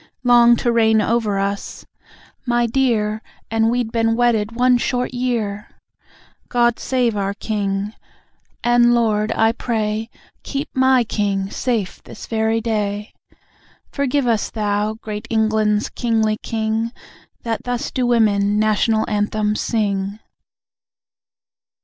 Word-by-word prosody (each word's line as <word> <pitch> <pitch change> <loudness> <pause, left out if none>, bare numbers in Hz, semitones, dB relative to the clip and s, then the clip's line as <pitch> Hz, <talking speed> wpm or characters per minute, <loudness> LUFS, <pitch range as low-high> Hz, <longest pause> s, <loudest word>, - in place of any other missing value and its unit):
LONG 240 -1 +6
TO 240 +1 0
REIGN 220 -1 +4
OVER 215 -2 0
US. 200 +1 -3 0.6
(My 240 0 +2
dear! 225 -4 0 0.3
And 225 0 +2
we'd 240 -1 -1
been 225 -1 +1
wedded 230 -3 +1
one 250 +1 +3
short 250 +1 -1
year!) 230 -5 -2 0.8
GOD 240 -1 +2
SAVE 245 -4 0
OUR 200 0 -2
KING. 205 -1 -2 0.7
(And 240 0 +4
Lord, 215 -2 +1
I 225 0 +3
pray 220 -2 -2 0.3
Keep 280 +2 -4
MY 260 -1 +4
King 200 -3 -2
safe 230 -7 -2
this - - -11
very 225 0 0
day.) 210 -2 -2 0.8
Forgive 280 -1 0
us, 230 -3 +1
thou 210 0 -1
great 215 0 -7
England's 215 -1 +1
kingly 220 -3 0
King 225 +1 -2 0.5
That 230 -2 -3
thus 245 +2 -2
do 255 -2 0
women 210 -3 +2
National 215 +1 +2
Anthems 210 0 0
sing. 200 -3 -1
225 Hz, 120 wpm, -20 LUFS, 210-240 Hz, 0.8 s, LONG